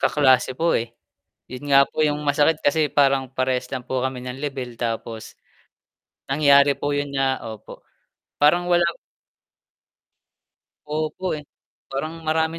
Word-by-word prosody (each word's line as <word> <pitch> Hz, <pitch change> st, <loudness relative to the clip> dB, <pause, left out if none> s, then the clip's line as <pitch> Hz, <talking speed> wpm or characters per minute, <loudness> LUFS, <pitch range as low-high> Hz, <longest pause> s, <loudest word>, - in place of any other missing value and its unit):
Kaklase 130 Hz, -3 st, +3 dB
po, 170 Hz, +1 st, +1 dB
eh. 115 Hz, 0 st, -6 dB, 0.6 s
'Yun 130 Hz, +3 st, -8 dB
nga 140 Hz, 0 st, +7 dB
po -, -, -4 dB
'yung 150 Hz, 0 st, 0 dB
masakit 145 Hz, +2 st, +2 dB
kasi 150 Hz, +2 st, +3 dB
parang, 135 Hz, -2 st, +3 dB
parehas 130 Hz, -1 st, -1 dB
lang 130 Hz, -2 st, -4 dB
po 130 Hz, 0 st, -2 dB
kami 130 Hz, -1 st, -3 dB
ng 125 Hz, +1 st, -6 dB
lebel, 135 Hz, -4 st, -5 dB
tapos 115 Hz, -1 st, -4 dB, 1.0 s
nangyari 140 Hz, 0 st, +5 dB
po 145 Hz, 0 st, -2 dB
yun 145 Hz, 0 st, -2 dB
na 135 Hz, -1 st, 0 dB
opo, 110 Hz, -2 st, -10 dB, 0.6 s
parang 175 Hz, +4 st, +4 dB
wala 175 Hz, -1 st, +3 dB, 2.0 s
Opo, 155 Hz, +4 st, -3 dB
eh. 150 Hz, -, -13 dB, 0.4 s
Parang 155 Hz, +4 st, -5 dB
marami 160 Hz, +1 st, 0 dB
140 Hz, 135 wpm, -22 LUFS, 130-150 Hz, 2.0 s, nga